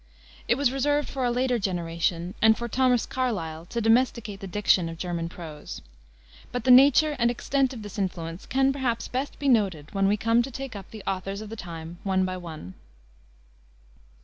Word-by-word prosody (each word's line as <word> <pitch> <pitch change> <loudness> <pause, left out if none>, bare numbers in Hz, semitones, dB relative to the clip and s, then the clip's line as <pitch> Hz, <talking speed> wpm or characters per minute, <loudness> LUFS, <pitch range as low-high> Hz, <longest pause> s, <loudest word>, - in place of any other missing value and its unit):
It 235 - +4
was 275 -1 +2
reserved 290 +2 +1
for 265 -2 -2
a - - +2
later 250 0 +1
generation 170 -1 -1
and 220 0 +6
for 235 - -4
Thomas 250 0 +2
Carlyle 170 -11 -3
to 235 - -3
domesticate 225 -2 +2
the 195 - -7
diction 185 -3 +2
of 165 - -7
German 170 -1 -3
prose. 160 -4 -9 0.7
But 245 -2 -3
the 255 - +4
nature 285 +4 +7
and 235 0 +4
extent 265 +2 0
of 235 -5 -8
this 205 0 -7
influence 170 -2 -4
can, 270 +1 +2
perhaps, 250 -4 -1
best 265 +3 -3
be 285 - -2
noted 195 - +1
when 195 -1 +2
we 205 +1 +2
come 230 +3 +3
to 250 - -4
take 265 -2 -7
up 195 - -8
the 215 -3 -10
authors 195 +1 -3
of 215 -1 -8
the - - -5
time 170 -3 -8
one 190 -1 +1
by 185 0 -3
one. 160 - -8
215 Hz, 190 wpm, -26 LUFS, 175-250 Hz, 0.7 s, nature